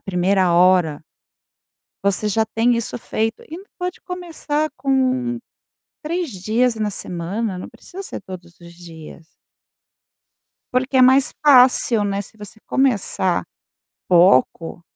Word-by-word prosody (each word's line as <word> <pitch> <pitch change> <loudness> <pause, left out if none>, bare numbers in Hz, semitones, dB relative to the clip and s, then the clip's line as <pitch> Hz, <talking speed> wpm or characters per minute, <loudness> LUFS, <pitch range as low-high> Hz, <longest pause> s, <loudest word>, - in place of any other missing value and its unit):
1ª 185 0 +1
hora, 175 -4 +3 1.0
você 200 +1 +1
já 220 +2 +1
tem 225 +2 +1
isso 230 -1 -3
feito 225 -1 -3
e 315 - -14
ainda 385 +4 -13
pode 360 0 -5
começar 325 -4 -4
com 255 -2 0 0.6
3 335 +1 -3
dias 225 +5 0
na 215 -1 -2
semana, 190 +3 -4
não 180 - -8
precisa 390 +2 -11
ser - - -7
todos 175 -3 -11
os 170 0 -14
dias. 165 -2 -13 1.5
Porque 255 +1 0
é - - +6
mais 260 +2 +4
fácil, 250 -5 +5
né, 200 0 -2
se 210 +2 -15
você 210 +1 -11
começar 210 -8 0 0.6
pouco, 170 -1 +3
220 Hz, 125 wpm, -20 LUFS, 180-260 Hz, 1.5 s, é